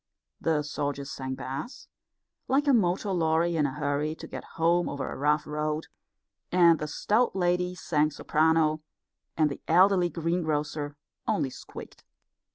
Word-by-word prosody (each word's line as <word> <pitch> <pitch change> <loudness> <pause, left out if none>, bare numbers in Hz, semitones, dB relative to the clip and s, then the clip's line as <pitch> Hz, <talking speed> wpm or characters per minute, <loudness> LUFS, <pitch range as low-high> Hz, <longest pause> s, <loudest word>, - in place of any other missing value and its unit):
The 155 -2 +1
soldier 145 -1 -3
sang 130 -1 -5
bass, 135 - -6 0.6
like 275 +2 +2
a 280 - +5
motor 195 -2 +2
lorry 165 -1 +1
in 150 -3 +2
a 135 - -5
hurry 150 +1 -1
to - - -9
get - - -7
home 170 +2 +2
over 140 -2 -4
a - - -5
rough 150 +2 +1
road, 150 +1 -3 0.6
and 170 -2 +5
the 150 - -3
stout 215 +10 +1
lady 180 0 +1
sang 155 -4 +1
soprano, 155 +1 +2 0.6
and 155 -2 +4
the - - -7
elderly 180 +1 +5
greengrocer 155 -3 -2 0.3
only 135 - 0
squeaked. - - -11
160 Hz, 145 wpm, -28 LUFS, 150-175 Hz, 0.6 s, a